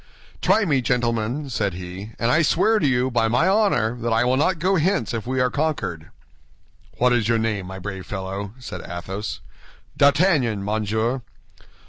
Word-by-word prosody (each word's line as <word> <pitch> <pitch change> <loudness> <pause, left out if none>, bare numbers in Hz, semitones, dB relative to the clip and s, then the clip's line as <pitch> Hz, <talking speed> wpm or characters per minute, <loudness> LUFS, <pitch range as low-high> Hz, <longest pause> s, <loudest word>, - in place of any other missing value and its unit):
"Try 205 +4 +3
me, 140 -7 +2
gentlemen," 120 +2 -1
said 100 -5 -1
he, 90 +4 -8
"and 115 +1 +1
I 160 - +4
swear 210 +8 +3
to 150 - +2
you 130 0 +1
by 115 -2 +2
my 125 +10 +2
honor 190 - +2
that 120 0 -2
I 115 +1 +3
will 125 +1 +2
not 160 +6 +2
go 185 +4 +1
hence 185 +1 0
if 115 0 -4
we 130 0 -1
are 125 -1 +2
conquered." 145 - -2 0.9
"What 125 0 +3
is 115 -3 +1
your 115 - +3
name, 110 -4 -1
my 95 +1 -7
brave 95 0 -7
fellow?" 95 +1 -5
said 130 - -7
Athos. 95 +4 -6 0.5
"D'Artagnan, 140 - +3
monsieur." 110 +4 -1
120 Hz, 170 wpm, -23 LUFS, 105-145 Hz, 0.9 s, I